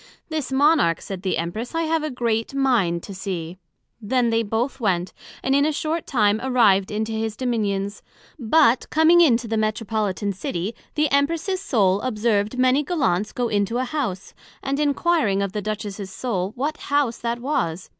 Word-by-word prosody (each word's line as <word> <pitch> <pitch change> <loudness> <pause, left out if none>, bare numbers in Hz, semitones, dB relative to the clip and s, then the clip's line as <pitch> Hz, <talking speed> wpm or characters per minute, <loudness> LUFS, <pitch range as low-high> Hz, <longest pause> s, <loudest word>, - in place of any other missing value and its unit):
This 310 -5 -3
Monarch, 280 - +3
said 190 -2 -7
the 190 -1 -1
Empress, 215 - -4
I 330 - +1
have 325 0 0
a 310 - -2
great 235 -1 -1
mind 225 -11 +1
to 200 - -8
see. 185 -2 -5 0.4
Then 235 +2 +1
they 225 0 +2
both 230 +5 -2
went, 185 -5 0 0.3
and 265 - +1
in 280 +1 +4
a 310 - +2
short 315 +2 -2
time 215 -4 +2
arrived 220 -7 +3
into 215 +1 -2
his 220 -1 -2
Dominions; 205 -5 -2 0.4
but 240 0 +3
coming 320 +2 +5
into 240 -7 +3
the 225 0 -1
Metropolitan 215 -2 -1
City, 185 +2 -4 0.2
the 305 -1 +1
Empress's 330 +7 +1
Soul 200 - +2
observed 215 -1 0
many 255 +2 +3
Gallants 260 - 0
go 245 -1 -1
into 210 +2 0
an 255 - 0
House; 240 -9 -4 0.3
and 275 +1 -1
enquiring 290 - +1
of 200 - -3
the 210 +1 -3
Duchess's 205 -1 -5
Soul, 195 -4 -2
what 290 +5 -2
House 285 -5 0
that 235 0 -2
was? 215 - -2
230 Hz, 170 wpm, -23 LUFS, 200-275 Hz, 0.4 s, coming